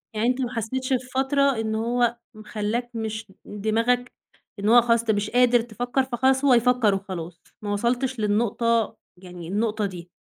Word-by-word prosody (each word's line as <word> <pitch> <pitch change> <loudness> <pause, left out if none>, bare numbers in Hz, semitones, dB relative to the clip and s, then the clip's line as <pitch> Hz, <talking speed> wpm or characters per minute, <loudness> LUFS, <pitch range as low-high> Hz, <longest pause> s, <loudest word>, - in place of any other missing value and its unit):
يعني 215 +2 +1
أنت 255 +1 0
ما 250 -1 -3
حسّيتش 255 +3 -2
في 250 - +2
فترة 270 +2 +1 0.2
إن 220 -1 -2
هو 235 +1 0 0.2
م 215 -1 -12
خلّاك 220 +3 -3
مش 220 -2 -5
دماغك 230 +4 0 0.5
إنه 215 +4 +4
هو 240 - +8
خلاص 230 0 +2
أنت 230 -1 0
مش 205 -1 -1
قادر 245 -1 +4
تفكّر، 245 +3 -2
فخلاص 265 +2 +1
هو 270 - +6
يفكّر 240 -3 +3
وخلاص، 180 -4 -7 0.2
ما 205 -1 -3
وصلتش 245 +4 -1
للنقطة 225 +2 +1 0.2
يعني 180 -2 -10
النقطة 210 +3 -1
دي. 180 -3 -7
230 Hz, 170 wpm, -24 LUFS, 210-245 Hz, 0.5 s, هو